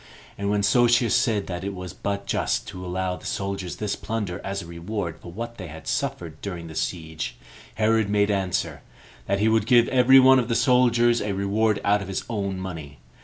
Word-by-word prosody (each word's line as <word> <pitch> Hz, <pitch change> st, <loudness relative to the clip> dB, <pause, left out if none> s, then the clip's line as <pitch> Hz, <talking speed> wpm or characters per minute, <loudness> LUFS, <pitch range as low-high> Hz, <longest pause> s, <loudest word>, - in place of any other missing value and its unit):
And 100 Hz, 0 st, -3 dB
when 105 Hz, 0 st, +1 dB
Sosius 120 Hz, +2 st, +4 dB
said 110 Hz, -5 st, +1 dB
that 90 Hz, 0 st, -5 dB
it 100 Hz, 0 st, -4 dB
was 90 Hz, -2 st, -7 dB
but 100 Hz, 0 st, -3 dB
just -, -, -1 dB
to 90 Hz, -2 st, -8 dB
allow 90 Hz, 0 st, -2 dB
the -, -, -14 dB
soldiers 95 Hz, -2 st, -3 dB
this 105 Hz, -2 st, -2 dB
plunder 105 Hz, -6 st, -4 dB
as 100 Hz, -1 st, -3 dB
a -, -, -10 dB
reward 85 Hz, +1 st, -5 dB
for 85 Hz, -, -10 dB
what 115 Hz, +4 st, -7 dB
they 90 Hz, -5 st, -7 dB
suffered 80 Hz, -3 st, -3 dB
during 90 Hz, -4 st, -5 dB
the 80 Hz, -, -9 dB
siege, 80 Hz, -4 st, -4 dB, 0.4 s
Herod 110 Hz, -1 st, +2 dB
made 100 Hz, 0 st, +2 dB
answer, 90 Hz, -7 st, -1 dB, 0.5 s
that 100 Hz, -, +1 dB
he 105 Hz, +2 st, +2 dB
would 110 Hz, -1 st, +2 dB
give 120 Hz, -1 st, +5 dB
every 130 Hz, +1 st, +6 dB
one 130 Hz, 0 st, +7 dB
of 120 Hz, -, -1 dB
the 115 Hz, -, 0 dB
soldiers 120 Hz, -2 st, +3 dB
a 105 Hz, -1 st, -2 dB
reward 100 Hz, +2 st, +1 dB
out 105 Hz, 0 st, +3 dB
of 100 Hz, -, -6 dB
his 95 Hz, -, -3 dB
own 100 Hz, -4 st, -3 dB
money. 80 Hz, -7 st, -7 dB
100 Hz, 200 wpm, -24 LUFS, 90-110 Hz, 0.5 s, one